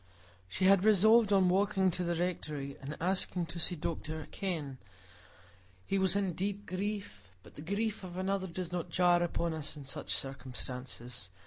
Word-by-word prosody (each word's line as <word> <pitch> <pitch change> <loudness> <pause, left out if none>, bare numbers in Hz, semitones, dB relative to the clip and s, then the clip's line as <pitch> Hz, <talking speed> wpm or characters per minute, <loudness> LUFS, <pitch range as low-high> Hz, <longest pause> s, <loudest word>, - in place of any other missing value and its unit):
She 185 - -1
had 195 -1 +6
resolved 215 +1 +6
on 190 -2 +5
walking 190 0 +3
to 180 +1 -2
the 170 0 0
Rectory 150 -5 -2
and 145 +3 -6
asking 180 0 0
to 170 +1 -6
see 175 +2 +3
Dr 155 -1 -4
Kenn; 155 -9 -3 1.1
he 195 - 0
was 190 0 +4
in 195 -3 +1
deep 200 +3 -3
grief, 190 - -4
but - - -15
the - - -9
grief 200 +5 -2
of 180 -1 -7
another 190 0 -1
does 180 0 -5
not 175 -2 -3
jar 175 -1 +4
upon 170 -1 0
us 155 -1 -3
in 145 - -8
such 135 - -3
circumstances. 125 -4 -5
180 Hz, 165 wpm, -32 LUFS, 150-195 Hz, 1.1 s, had